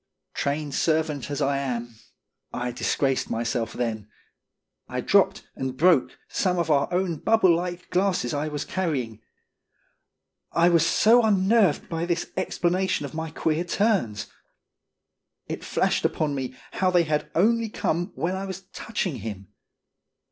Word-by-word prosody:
Trained 145 Hz, 0 st, -2 dB
servant 155 Hz, -4 st, 0 dB
as 145 Hz, 0 st, -1 dB
I 140 Hz, 0 st, +1 dB
am, 120 Hz, -3 st, -3 dB, 0.6 s
I 125 Hz, 0 st, -3 dB
disgraced 135 Hz, +2 st, 0 dB
myself 115 Hz, 0 st, -1 dB
then. 110 Hz, -4 st, -3 dB, 0.8 s
I -, -, -3 dB
dropped -, -, +2 dB
and 130 Hz, -1 st, -4 dB
broke 165 Hz, -4 st, +3 dB
some 180 Hz, -2 st, 0 dB
of 165 Hz, -2 st, 0 dB
our 140 Hz, -1 st, +2 dB
own 180 Hz, -2 st, 0 dB
bubble 190 Hz, -2 st, +4 dB
like 175 Hz, +1 st, -4 dB
glasses 180 Hz, -9 st, +1 dB
I 145 Hz, +1 st, -1 dB
was 150 Hz, -1 st, -4 dB
carrying. 130 Hz, -, -2 dB, 1.3 s
I 170 Hz, +1 st, +4 dB
was 170 Hz, -2 st, +4 dB
so 225 Hz, +7 st, +5 dB
unnerved 200 Hz, -4 st, +3 dB
by 165 Hz, 0 st, -3 dB
this 170 Hz, -1 st, -2 dB
explanation 185 Hz, -2 st, 0 dB
of 140 Hz, -, -8 dB
my 160 Hz, 0 st, -4 dB
queer 160 Hz, +1 st, 0 dB
turns. 175 Hz, -, 0 dB, 1.2 s
It -, -, -6 dB
flashed -, -, 0 dB
upon 150 Hz, -2 st, 0 dB
me 130 Hz, -2 st, -4 dB, 0.2 s
how 185 Hz, -, +1 dB
they 175 Hz, -1 st, +4 dB
had 150 Hz, -2 st, -1 dB
only 225 Hz, +5 st, +3 dB
come 175 Hz, -3 st, -1 dB
when 175 Hz, +3 st, -1 dB
I 190 Hz, +1 st, -4 dB
was 190 Hz, 0 st, -6 dB
touching 185 Hz, -, -3 dB
him. 100 Hz, -3 st, -7 dB
160 Hz, 140 wpm, -25 LUFS, 135-185 Hz, 1.3 s, so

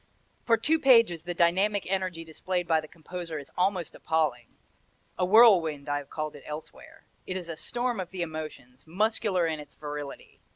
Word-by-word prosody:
For 230 Hz, -1 st, +5 dB
two 310 Hz, +8 st, +2 dB
pages 230 Hz, -, +5 dB
the 175 Hz, +1 st, -5 dB
dynamic 190 Hz, +4 st, +2 dB
energy 185 Hz, -3 st, -2 dB
displayed 175 Hz, +2 st, -3 dB
by 160 Hz, -1 st, +3 dB
the 155 Hz, -, -11 dB
composer 165 Hz, 0 st, -7 dB
is 140 Hz, -2 st, -9 dB
almost 180 Hz, -2 st, 0 dB
appalling. 150 Hz, -7 st, -1 dB, 0.7 s
A 180 Hz, -, +3 dB
whirlwind 180 Hz, -9 st, +6 dB
I 145 Hz, 0 st, 0 dB
have 140 Hz, -, -11 dB
called 155 Hz, -1 st, -4 dB
it 145 Hz, -, -11 dB
elsewhere. 150 Hz, +1 st, -10 dB, 0.2 s
It 185 Hz, -, -2 dB
is 180 Hz, -2 st, -6 dB
a 165 Hz, -, -4 dB
storm 240 Hz, +6 st, -2 dB
of 180 Hz, -2 st, -4 dB
the 180 Hz, -2 st, -3 dB
emotions, 155 Hz, -5 st, -8 dB
muscular 195 Hz, 0 st, +1 dB
in 160 Hz, -2 st, -2 dB
its 145 Hz, -1 st, -12 dB
virility. 145 Hz, -1 st, -8 dB
170 Hz, 175 wpm, -28 LUFS, 155-190 Hz, 0.7 s, whirlwind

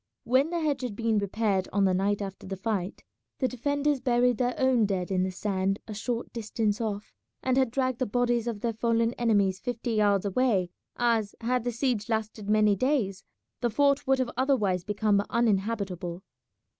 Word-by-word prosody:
When 260 Hz, +5 st, +3 dB
the 345 Hz, 0 st, -1 dB
hedge 300 Hz, -4 st, 0 dB
had 245 Hz, -5 st, -4 dB
been 225 Hz, -1 st, +1 dB
repaired 200 Hz, -1 st, 0 dB
on 200 Hz, -1 st, +2 dB
the 190 Hz, -, +3 dB
night 200 Hz, +2 st, 0 dB
after 195 Hz, -1 st, -8 dB
the 195 Hz, 0 st, -4 dB
fight 195 Hz, -2 st, -3 dB, 0.3 s
the 260 Hz, -, +1 dB
defenders 285 Hz, +3 st, 0 dB
buried 245 Hz, -1 st, +2 dB
their 250 Hz, 0 st, +1 dB
own 255 Hz, -5 st, +3 dB
dead 190 Hz, -2 st, -2 dB
in 185 Hz, -1 st, +1 dB
the 185 Hz, -, 0 dB
sand 195 Hz, 0 st, -1 dB
a 215 Hz, -, -6 dB
short 235 Hz, +3 st, -4 dB
distance 220 Hz, -1 st, -1 dB
off, 210 Hz, -2 st, -4 dB, 0.3 s
and 260 Hz, -1 st, +1 dB
had 260 Hz, -2 st, +3 dB
dragged 255 Hz, 0 st, -1 dB
the 255 Hz, -, 0 dB
bodies 240 Hz, +1 st, +1 dB
of 220 Hz, -4 st, -3 dB
their 235 Hz, -1 st, -1 dB
fallen 230 Hz, +1 st, +1 dB
enemies 205 Hz, -6 st, +1 dB
fifty 245 Hz, -1 st, -3 dB
yards 205 Hz, -3 st, +2 dB
away, 200 Hz, -4 st, +1 dB, 0.2 s
as, 230 Hz, -4 st, +1 dB
had 245 Hz, +1 st, 0 dB
the 245 Hz, -, 0 dB
siege 235 Hz, -3 st, -1 dB
lasted 215 Hz, -2 st, -3 dB
many 210 Hz, -1 st, +4 dB
days, 205 Hz, -6 st, 0 dB, 0.4 s
the 240 Hz, -, +1 dB
fort 280 Hz, +4 st, +2 dB
would 270 Hz, 0 st, +4 dB
have 255 Hz, -2 st, -1 dB
otherwise 220 Hz, -9 st, +1 dB
become 210 Hz, 0 st, +1 dB
uninhabitable. 195 Hz, -5 st, -1 dB
225 Hz, 180 wpm, -28 LUFS, 200-245 Hz, 0.4 s, many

